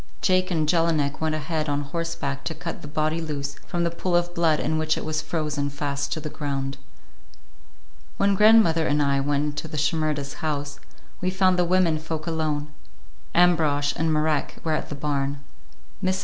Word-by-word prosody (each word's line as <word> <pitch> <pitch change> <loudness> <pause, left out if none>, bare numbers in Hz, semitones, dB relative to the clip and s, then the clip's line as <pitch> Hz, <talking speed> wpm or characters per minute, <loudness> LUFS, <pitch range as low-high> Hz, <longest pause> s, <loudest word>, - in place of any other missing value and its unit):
Jake 185 -1 +2
and 160 -4 0
Jelinek 160 -4 +1
went 160 -1 +1
ahead 155 0 -2
on 145 0 0
horseback 145 -2 -3
to 160 - -3
cut 170 - -6
the - - -8
body 155 +2 0
loose 145 -3 -3
from 175 0 -1
the 170 - +1
pool 175 +1 -1
of 175 0 +1
blood 165 -3 +2
in 155 - 0
which 155 0 +1
it - - -4
was 155 -1 -1
frozen 150 -3 -2
fast 140 0 -3
to - - -3
the 155 - -6
ground. 140 -2 -3 1.4
When 200 0 +3
grandmother 195 -6 +5
and 145 +1 +2
I 140 -1 +2
went 145 +1 +1
into 150 +2 -4
the 155 - -6
Shimerdas' 150 -2 0
house, 145 -2 -2 0.4
we 185 - +1
found 185 -1 +3
the 175 - +4
women 170 -3 +3
folk 155 0 -5
alone; 155 -2 -1 0.6
Ambrosch 155 -5 +3
and 160 0 +1
Marek 155 -1 +1
were 160 - 0
at - - -2
the 145 - -4
barn. 140 -1 -2 0.6
Mrs. 185 0 +1
155 Hz, 180 wpm, -25 LUFS, 145-170 Hz, 1.4 s, grandmother